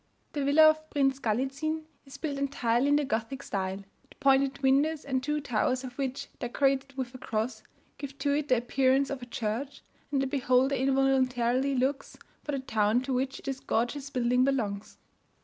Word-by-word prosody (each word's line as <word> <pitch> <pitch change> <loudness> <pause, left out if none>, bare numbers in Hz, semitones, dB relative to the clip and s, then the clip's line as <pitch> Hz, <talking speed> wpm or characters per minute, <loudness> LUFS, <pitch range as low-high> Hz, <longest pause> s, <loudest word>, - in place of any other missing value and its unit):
The 290 - -1
villa 300 +3 +7
of 310 0 +2
Prince 270 -2 +1
Gallizin 275 +7 -1 0.2
is 270 - -10
built 285 -4 -3
entirely 260 -2 +1
in 290 - +4
the 295 0 +2
Gothic 245 +4 -3
style. 190 0 -3 0.3
The - - -18
pointed 275 0 +2
windows, 290 +4 +2
and 265 -2 0
two 295 +3 -1
towers 255 -1 0
of 250 -1 -8
which, 270 0 -2
decorated 270 +2 0
with 255 -2 -4
a 255 - -9
cross, 220 0 -3 0.4
give 280 -1 -7
to 285 -1 0
it 295 0 0
the 255 - +4
appearance 265 +3 +2
of 275 -2 -4
a 245 - -8
church, 235 +4 -4 0.3
and 280 - +1
the 270 - +1
beholder 265 0 +2
involuntarily 265 -1 +2
looks 265 +2 -1 0.3
for 295 - -3
the - - 0
town 220 -1 +1
to 265 0 -2
which 260 +1 -2
this 270 -1 -3
gorgeous 270 +4 -1
building 250 -1 +2
belongs. 220 -7 -1
270 Hz, 180 wpm, -29 LUFS, 245-280 Hz, 0.4 s, villa